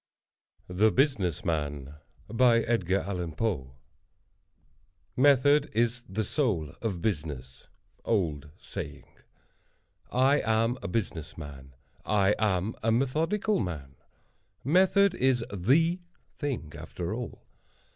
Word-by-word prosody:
THE 95 +5 +3
BUSINESS 105 - +1
MAN 75 -4 -2 0.3
Method 100 - +1 2.0
is 120 +2 +1
the 105 +4 -1
soul 100 - -1
of 100 -7 -2
business.—OLD 80 - -3
SAYING. - - -7 1.1
I 135 +3 +4
am 115 +2 +1
a - - -4
business 90 -7 -3
man. 70 -3 -10 0.3
I 105 -1 +3
am 100 0 +1
a 115 - +2
methodical 160 - +1
man. 75 -8 -4 0.7
Method 190 - +4
is 130 -7 +1
the 155 - +3 0.3
thing, 130 - -4
after 90 +3 -5
all. 120 0 -6
105 Hz, 85 wpm, -28 LUFS, 85-125 Hz, 2.0 s, I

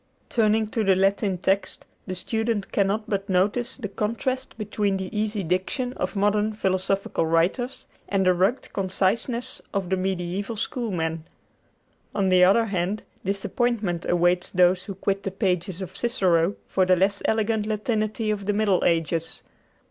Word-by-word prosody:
Turning 220 -1 +2
to 225 0 -1
the 195 -2 +4
Latin 195 0 +1
text, 195 +2 -1 0.2
the 185 - -3
student 220 +1 -2
cannot 205 +2 +1
but 200 -1 -2
notice 200 +6 +1
the 240 -6 -4
contrast 230 +6 -3
between 205 -2 -1
the 190 +2 -6
easy 210 -1 -1
diction 190 - -1
of 185 -4 -3
modern 205 +2 +2
philosophical 190 -3 0
writers 175 +11 0 0.2
and 195 -1 +1
the 185 - +5
rugged 190 +9 0
conciseness 225 +6 0
of 190 -2 -1
the - - +4
mediæval 190 +3 -2
Schoolman. 170 -9 -2 0.9
On 195 -2 +2
the 185 0 +6
other 200 +5 +5
hand, 195 0 -2 0.2
disappointment 200 -1 -1
awaits 175 0 +2
those 180 0 +3
who 195 - -6
quit 195 +1 -1
the 195 - -3
pages 190 -2 -1
of 185 - -9
Cicero 190 -7 +2
for 190 - +1
the 185 0 +4
less 200 +3 +1
elegant 220 -1 +1
Latinity 215 0 -1
of 200 -2 -3
the 205 - +2
Middle 200 -3 +2
Ages. 165 -1 0
195 Hz, 150 wpm, -25 LUFS, 185-215 Hz, 0.9 s, the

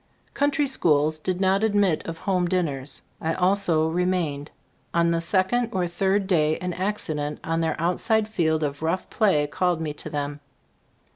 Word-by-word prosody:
Country 290 +1 +1
schools 155 - +2
did 180 +3 -2
not 195 +2 +2
admit 205 -6 +2
of 165 0 -5
home 180 0 0
dinners. 145 -7 -2 0.2
I 160 +1 -1
also 180 -4 +2
remained. 165 -4 -1 0.5
On 170 0 +3
the 165 0 0
second 200 +7 +1
or 185 -2 0
third 190 +3 0
day 155 -5 +2
an 180 0 -4
accident 160 -6 -2
on 165 0 -1
their 160 -1 -1
outside 210 +6 +1
field 160 -7 0
of 145 0 -3
rough 165 +4 -2
play 185 -9 +3
called 175 +3 0
me 155 -2 -3
to 145 - -7
them. 145 0 -3
170 Hz, 160 wpm, -24 LUFS, 155-190 Hz, 0.5 s, On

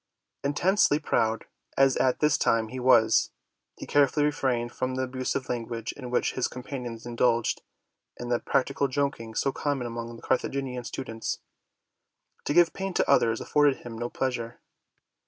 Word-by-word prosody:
Intensely 150 +3 +3
proud 115 -7 0 0.3
as 135 -1 +5
at 130 - +1
this 150 -1 +4
time 115 -1 +1
he 130 - -6
was, 115 -3 +4 0.5
he - - -7
carefully 145 +1 +3
refrained 125 -5 0
from 130 +1 -3
the 130 - -1
abusive 130 +1 -3
language 115 -1 -3
in 125 -3 -8
which 125 - +1
his 130 - 0
companions 125 -3 -7
indulged, 120 -1 +1 0.6
and 120 0 -5
the 120 - +2
practical 140 +1 0
joking 130 -5 -2
so 135 - +1
common 140 -2 -2
among 115 0 -5
the 115 - -14
Carthaginian 130 -1 -1
stu 135 - -4
dents. 115 -3 -4 1.1
To - - 0
give 175 -1 +5
pain 195 -1 -4
to - - +2
others 115 -1 +3
afforded 145 -2 +2
him 120 -1 -7
no 120 +1 -3
pleasure. 120 -3 -3
125 Hz, 155 wpm, -27 LUFS, 115-140 Hz, 1.1 s, as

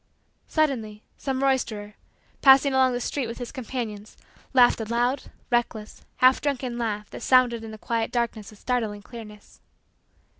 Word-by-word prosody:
Suddenly, 230 -9 -1
some 270 -1 -2
roisterer, 220 -6 0 0.5
passing 270 0 +7
along 260 -1 +4
the 245 - -1
street 255 +1 -2
with 230 - -6
his 245 -2 -6
companions, 225 -5 -6 0.3
laughed 245 -3 +5
a - - -3
loud, 240 +4 0 0.3
reckless, 230 -3 -1 0.2
half 255 +1 +5
drunken, 255 -4 -2
laugh 210 -2 -3
that - - -8
sounded 245 -3 +3
in 225 - -7
the 220 - -8
quiet 225 +1 -2
darkness 235 -4 -2
with 215 - -15
startling 220 -4 -2
clearness. 210 -3 -12
240 Hz, 150 wpm, -25 LUFS, 215-260 Hz, 0.5 s, passing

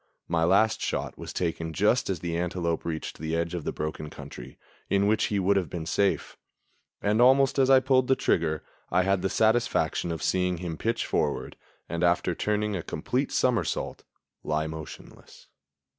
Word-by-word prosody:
My 85 -1 +1
last 100 +5 +3
shot - - -2
was - - -8
taken 80 -2 -2
just 105 +7 +2
as 90 -5 -2
the 85 -1 -2
antelope 85 -1 -1
reached 80 -2 -4
the 80 +1 -2
edge 85 +1 -1
of 85 -4 -4
the - - -1
broken 75 0 -4
country, - - -10 0.3
in 100 0 +3
which 110 +1 +2
he 105 - -1
would 100 +1 +3
have 90 -6 -1
been 85 0 -5
safe; 100 +4 0 0.7
and 105 +3 +2
almost 135 +2 +5
as 130 -1 +4
I 135 -1 +7
pulled 130 -1 +3
the 130 - +4
trigger 80 - 0 0.3
I 90 +1 +3
had 95 0 +1
the 95 - 0
satisfaction 110 -6 +1
of 80 - -4
seeing 90 -1 +1
him 85 -1 -4
pitch 115 +7 -1
forward - - -1 0.3
and, 85 +2 -3
after 85 -1 +2
turning 105 0 -1
a 90 - -2
complete - - -2
somersault, - - 0 0.4
lie 75 0 0
motionless. 80 -2 -10
90 Hz, 175 wpm, -27 LUFS, 80-105 Hz, 0.7 s, I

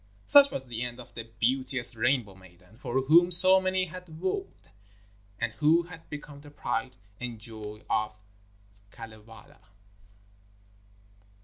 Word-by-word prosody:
Such 280 -1 +7
was 135 - -6
the 120 -2 -6
end 120 0 -6
of 120 - -14
the 115 - -8
beauteous 125 0 +3
Rainbow 120 -3 0
maiden, 95 +3 -20
for 130 0 -2
whom 170 +6 +5
so 185 +2 +7
many 185 0 -1
had 175 -2 -12
wooed, 190 - -5 0.7
and 120 -2 -3
who 160 +3 +3
had 165 -1 -14
become 145 -1 -10
the 145 - -14
pride 130 -2 -4 0.2
and 120 -2 -6
joy 105 -1 -5
of 105 0 -2 0.7
Kalevala. 115 +7 -13
130 Hz, 130 wpm, -27 LUFS, 115-165 Hz, 0.7 s, Such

